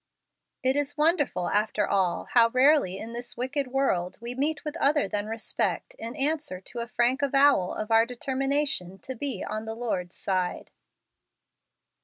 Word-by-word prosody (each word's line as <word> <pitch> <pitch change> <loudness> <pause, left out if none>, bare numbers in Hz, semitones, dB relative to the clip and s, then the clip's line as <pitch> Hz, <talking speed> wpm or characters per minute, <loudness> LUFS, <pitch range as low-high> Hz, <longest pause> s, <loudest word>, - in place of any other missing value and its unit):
It 260 +1 +3
is 290 +1 0
wonderful, 300 - +1
after 210 0 +1
all, 190 -3 0
how 230 -1 +6
rarely 255 -6 +3
in 225 +3 -7
this 240 0 -5
wicked 260 +3 -1
world 190 -9 0
we 235 +1 -4
meet 295 +5 -1
with 300 +1 -4
other 290 -5 +2
than 205 +1 -3
respect 225 0 -2
in 230 +3 -5
answer 295 -9 0
to 235 +5 -7
a 235 - -4
frank 245 +3 +1
avowal 275 -8 +3
of 215 +1 -4
our 225 +1 +5
determination 265 -6 -1
to 260 - -7
be 255 -4 -3
on 215 +1 -4
the 220 0 -5
Lord's 190 -7 -3
side. 185 -2 -2
240 Hz, 160 wpm, -27 LUFS, 210-280 Hz, -, how